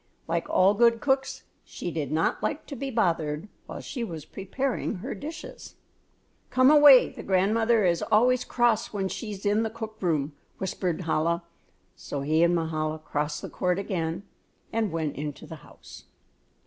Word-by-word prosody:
Like - - -2
all 190 +2 +4
good 230 +1 +4
cooks 270 0 0 0.2
she 175 - -6
did 155 -3 -3
not 160 +1 0
like 305 0 -2
to 285 - -7
be 275 +2 -4
bothered 165 - 0 0.2
while - - -7
she 245 - -5
was 165 -8 -6
preparing 245 +10 -3
her 210 +9 -5
dishes. 315 +2 -9 0.7
"Come 255 +2 +5
away, 290 -4 +8
the - - -10
grandmother 215 +3 +2
is 170 -1 +2
always 245 +4 +4
cross 240 -3 +1
when 195 -2 -2
she 225 - -5
is 200 -1 -7
in 205 +2 +3
the 225 - -1
cook 220 -1 -7
room," 155 -5 0 0.2
whispered 185 -2 -2
Chola; 165 +1 0 0.5
so 140 - -5
he 155 +3 +2
and 170 +1 +4
Mahala 155 -1 -1
crossed 150 -1 -3
the - - -5
court 180 0 0
again 175 -3 -3 0.5
and 225 -2 0
went 160 -3 -3
into 145 0 -5
the 160 - -9
house. - - -15
190 Hz, 165 wpm, -27 LUFS, 160-230 Hz, 0.7 s, away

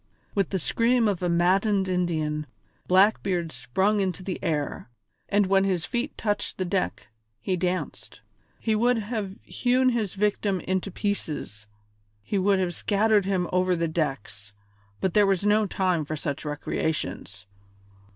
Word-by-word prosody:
With 195 -3 +1
the 195 - -1
scream 230 +6 +2
of 195 -4 -1
a 180 - 0
maddened 190 +3 +2
Indian, 155 -4 -1 0.4
Blackbeard 185 -3 +3
sprung 190 - 0
into 185 -2 -1
the 185 0 -5
air, 150 -7 -2 0.4
and 205 0 +3
when 195 0 +3
his 185 -4 0
feet 245 +4 -3
touched 205 -2 -1
the 185 - -1
deck 185 - -2 0.3
he 185 - -1
danced. 180 +1 -3 0.4
He 220 - 0
would 240 +3 +3
have 210 -3 -3
hewn 255 +1 +2
his 225 -6 -1
victim 205 -1 0
into 190 +1 -1
pieces, 155 - -4 0.6
he 195 - -1
would 195 +1 +3
have 180 -2 0
scattered 210 +2 +2
him 185 -3 0
over 185 0 +2
the 170 0 0
decks, 125 - -3 0.5
but 190 -3 0
there 205 -1 +5
was 195 0 +1
no 210 0 +3
time 185 -4 0
for 155 +1 -4
such 145 0 -4
recreations. 145 - -3
190 Hz, 150 wpm, -26 LUFS, 165-205 Hz, 0.6 s, there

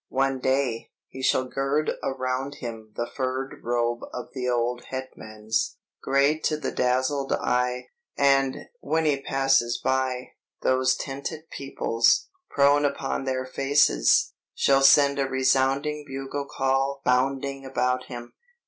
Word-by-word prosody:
One 135 0 0
day, 130 -3 0 0.2
he 130 - -9
shall 130 0 +2
gird 135 +4 -1
around 130 +1 -2
him 115 -5 -8
the 120 - -2
furred 130 +1 -4
robe 120 0 0
of 125 - -7
the 125 -1 -2
old 120 0 -1
Hetmans, 110 -4 -3 0.3
great 140 +3 +2
to 155 - +1
the 150 - -3
dazzled 130 +2 0
eye; 125 0 -1 0.3
and, 135 -1 +2
when 160 - 0
he 140 -3 +1
passes 135 -3 +2
by, 130 -1 -1 0.3
those 130 0 +3
tented 145 +4 -6
peoples, 115 -4 +1 0.2
prone 145 +1 +4
upon 140 -1 -1
their 130 -1 -1
faces, 135 - +3 0.2
shall 135 0 +3
send 140 +1 +6
a 135 - +1
resounding 135 +3 +1
bugle 135 +1 -5
call 135 +1 0
bounding 135 +2 0
about 125 -1 -1
him! 120 -2 -9
135 Hz, 130 wpm, -25 LUFS, 125-140 Hz, 0.3 s, send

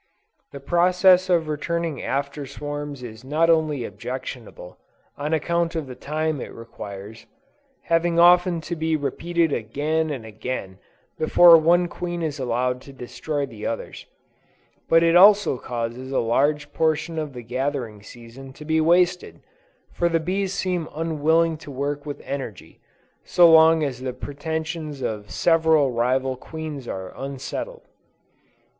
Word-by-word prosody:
The 140 - -8
process 180 +4 +4
of 170 -3 +2
returning 160 +1 -2
after 140 +1 -3
swarms 145 -1 -6
is 110 -1 -9
not 155 +5 +2
only 155 -5 +1
objectionable, 115 -3 -8 0.4
on 150 +2 -4
account 170 +1 0
of 160 -3 -2
the 130 - -8
time 155 +1 -3
it - - -7
requires, 105 -1 -10 0.6
having 170 0 +1
often 175 0 +5
to 170 +2 -5
be 160 0 0
repeated 165 +3 -1
again 150 +8 -1
and 130 -6 -5
again 110 -3 -6 0.4
before 170 +2 +7
one 170 +2 +4
queen 175 -1 -5
is 150 -2 -3
allowed 125 0 -1
to 140 - -13
destroy 140 +3 -4
the 110 -5 -7
others; 115 - -6 0.8
but 165 0 +5
it 165 0 +3
also 200 -7 +6
causes 120 +2 -5
a 135 - 0
large 145 +5 0
portion 160 +1 0
of 150 -3 -5
the 125 -1 -8
gathering 125 -3 -3
season 120 +5 -12
to 150 - -12
be 160 +1 +2
wasted; 175 +2 +2 0.5
for 175 - +1
the 165 -1 +1
bees 190 +3 -2
seem 180 -4 -2
unwilling 160 +1 +1
to 150 - -12
work 145 +2 -4
with 145 - -6
energy, 115 - -7 0.4
so 175 -1 +5
long 160 0 +6
as 130 -4 -3
the 130 -1 -3
pretensions 155 +1 -5
of 105 -3 -4
several 160 -4 +3
rival 130 +2 0
queens 150 -1 -7
are 95 -1 -6
unsettled. 140 - -6
150 Hz, 140 wpm, -23 LUFS, 130-165 Hz, 0.8 s, before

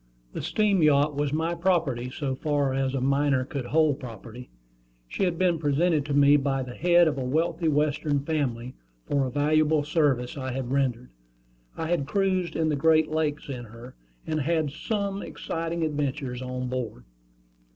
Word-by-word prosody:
The - - -4
steam 205 -4 +1
yacht 150 -1 +4
was 145 -1 -1
my 160 +3 0
property, 165 -9 0
so 135 0 -3
far 145 -1 0
as 135 0 -1
a 135 - -1
minor 140 -1 +2
could 135 -2 -5
hold 150 0 +2
property. 120 0 -10 0.6
She 195 - -1
had 175 -2 -1
been 175 -2 +2
presented 150 +1 +1
to 145 - -3
me 145 +1 +6
by 135 -1 -1
the 125 -1 -8
head 175 +2 +4
of 145 -3 -1
a - - -2
wealthy 165 +5 0
Western 150 -1 +1
family 130 -5 -2 0.3
for 140 -2 0
a - - -5
valuable 150 +1 +2
service 145 -4 0
I 130 -1 -4
had 130 -1 -4
rendered. 125 -3 -1 0.7
I 160 - -3
had 160 -5 0
cruised 190 -2 0
in 160 0 +1
the 150 - +1
Great 155 +2 +3
Lakes 155 -1 -1
in 125 -3 -6
her, 115 +3 -12 0.3
and 155 -1 -1
had 165 +5 +1
had 155 -3 0
some 200 +5 -3
exciting 165 +2 -4
adventures 145 -4 -2
on 125 0 -4
board. 125 - -4
145 Hz, 175 wpm, -26 LUFS, 130-160 Hz, 0.7 s, me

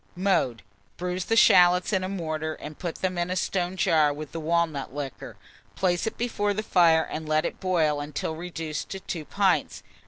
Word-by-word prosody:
Mode. 175 - 0 0.3
Bruise 180 0 -3
the 225 - +1
shalots 180 -2 +5
in 190 -2 +1
a 185 - -3
mortar, 155 -4 -3
and 150 0 -10
put 170 -2 -4
them 185 -1 0
in 175 +1 -1
a 185 - -1
stone 185 0 -1
jar 155 -4 +3
with 150 0 -7
the 165 - -5
walnut 160 -4 0
liquor; 140 -3 -6 0.4
place 180 +2 0
it - - -4
before 205 -4 -1
the 215 - -2
fire, 165 -5 +4
and 155 0 -6
let 155 +1 +2
it - - -4
boil 160 -6 +1
until 150 +2 -4
reduced 165 -2 -5
to 195 - -5
2 165 -4 -6
pints. - - 0
170 Hz, 190 wpm, -26 LUFS, 155-185 Hz, 0.4 s, shalots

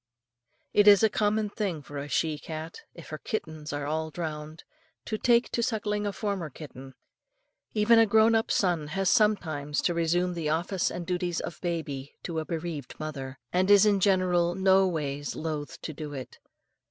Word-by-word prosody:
It 205 0 +5
is 205 0 +8
a 220 - +4
common 210 0 +1
thing 185 -9 -3
for 145 +1 -7
a 140 - -5
she 155 0 0
cat, 160 +1 -7
if 170 - -11
her 155 - -6
kittens 155 -7 -5
are 145 0 -3
all 160 +2 -2
drowned, 155 -1 -6 0.4
to 215 - -3
take 240 0 +3
to 235 - 0
suckling 210 -3 -1
a - - -1
former 195 -5 -3
kitten 135 -2 -11 0.8
even 225 +2 +5
a 225 - +5
grown 220 +2 +5
up 225 0 +1
son 175 -6 +1
has 190 +4 0
sometimes 160 - +1
to 175 - +2
resume 175 +2 +1
the 165 -3 -2
office 175 +4 0
and 175 - -5
duties 175 -1 -1
of 170 - -6
baby 155 -6 -4
to 165 -2 -3
a 160 - -4
bereaved 160 -5 -5
mother, 135 -4 -5 0.2
and 185 +2 +2
is 205 0 +7
in 205 -2 +3
general 180 -3 +2
no 190 0 +4
ways 145 -4 -3
loath 155 -2 -4
to 155 - -4
do 150 0 -7
so. 130 -2 -5
170 Hz, 180 wpm, -28 LUFS, 155-200 Hz, 0.8 s, is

